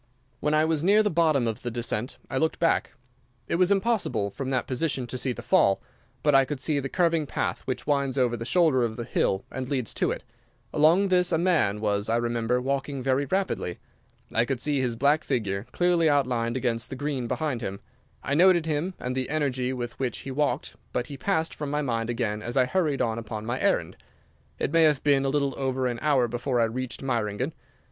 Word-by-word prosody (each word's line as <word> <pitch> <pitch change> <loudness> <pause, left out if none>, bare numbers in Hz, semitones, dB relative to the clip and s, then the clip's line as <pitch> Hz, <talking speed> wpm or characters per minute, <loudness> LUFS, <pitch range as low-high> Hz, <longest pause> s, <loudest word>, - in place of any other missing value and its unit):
When 150 +2 +1
I 155 +1 +4
was 160 -1 +1
near 205 +4 +5
the 210 - +1
bottom 155 -6 +3
of 110 -2 -2
the 120 - -3
descent 120 0 -3
I 130 - -2
looked 160 +2 +1
back. 165 - +1 0.5
It - - 0
was 185 +2 +3
impossible, 195 - +1
from 130 +5 -4
that 130 -2 0
position, 130 0 -1
to 120 - -7
see 130 +1 -1
the - - -7
fall, 95 0 +3 0.4
but 150 - +3
I 135 0 +7
could 135 +1 -4
see 145 +1 +1
the 135 0 -4
curving 165 -3 +1
path - - -2
which 130 - -3
winds 140 -2 0
over 125 -2 +2
the 115 - -5
shoulder 155 -1 +3
of 110 -2 -1
the 120 - -4
hill 95 -4 0
and 130 0 -5
leads 130 -6 -1
to - - 0
it. - - -3 0.5
Along 170 +6 +4
this 180 -1 +3
a 165 - +3
man 160 - +2
was, 105 -1 0
I 115 - +2
remember, 120 +1 0
walking 135 +1 -2
very 135 +2 +1
rapidly. 190 - -1 0.6
I 115 - +3
could 130 0 -2
see 145 0 0
his 125 -3 -1
black 145 +6 +3
figure 105 -5 -2
clearly 175 -2 +3
outlined 125 -4 +1
against 120 -2 -1
the - - -5
green 135 -3 -2
behind 145 -3 -2
him. 100 -3 -4 0.4
I 135 - -1
noted 175 +1 +5
him, 160 +4 -1
and 125 +1 -3
the 130 -1 -2
energy 135 -4 0
with 120 -2 -5
which 130 -3 -1
he 135 - -4
walked 140 0 -1 0.2
but 125 - -1
he 140 - -6
passed 160 +1 -1
from 150 -2 -5
my 150 +1 -1
mind 115 -3 -1
again 105 -3 -1
as 120 +5 -4
I 130 - +5
hurried 150 -1 0
on 115 -1 -1
upon 110 -1 -6
my 120 +2 -2
errand. - - 0 0.6
It - - -1
may 165 - +4
have 150 -3 +4
been 140 -2 +3
a - - +2
little 140 -1 0
over 130 -1 -1
an 120 -2 -1
hour 135 -5 +3
before 120 +2 -1
I - - +4
reached 120 +3 -3
Meiringen. 120 +2 -1
130 Hz, 215 wpm, -26 LUFS, 120-150 Hz, 0.6 s, I